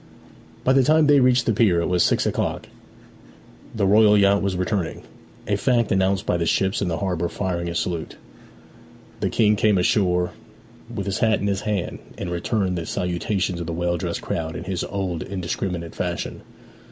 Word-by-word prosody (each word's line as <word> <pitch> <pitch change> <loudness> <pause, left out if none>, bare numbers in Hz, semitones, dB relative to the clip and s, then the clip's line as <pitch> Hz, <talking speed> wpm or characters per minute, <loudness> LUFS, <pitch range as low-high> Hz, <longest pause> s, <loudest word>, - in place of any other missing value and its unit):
By 130 - +3
the 135 - +5
time 155 +4 +4
they 145 -1 +5
reached 125 -1 +3
the 115 - +2
pier 100 -5 +3
it 85 - 0
was 90 -1 +1
six - - +2
o'clock; - - -2 1.1
the 105 -3 +1
royal 105 +1 +5
yacht 100 0 +4
was 100 -2 -1
returning; 90 -2 -2 0.4
a 100 - +1
fact 120 +2 +1
announced 95 0 +1
by 90 - +1
the 85 -1 -1
ships 95 +3 +1
in 100 - 0
the 85 -2 -1
harbour 90 -3 -1
firing 85 -3 -3
a 85 - -5
salute. 85 -1 -3 1.0
The - - 0
King 105 -1 +3
came 105 -1 +3
ashore 90 -1 +2 0.6
with 105 -4 -4
his 100 -1 -2
hat 110 -1 +2
in - - -3
his 100 -1 0
hand, 100 -4 -2 0.2
and 90 - -4
returned 90 +1 -1
the 80 - -6
salutations 90 +1 -1
of 85 - -5
the 85 - -3
well 85 +1 -1
dressed - - -4
crowd 80 0 -3
in - - -5
his 95 -1 -3
old 95 -4 -3
indiscriminate 90 -2 -4
fashion. 90 -1 -4
95 Hz, 185 wpm, -23 LUFS, 85-105 Hz, 1.1 s, the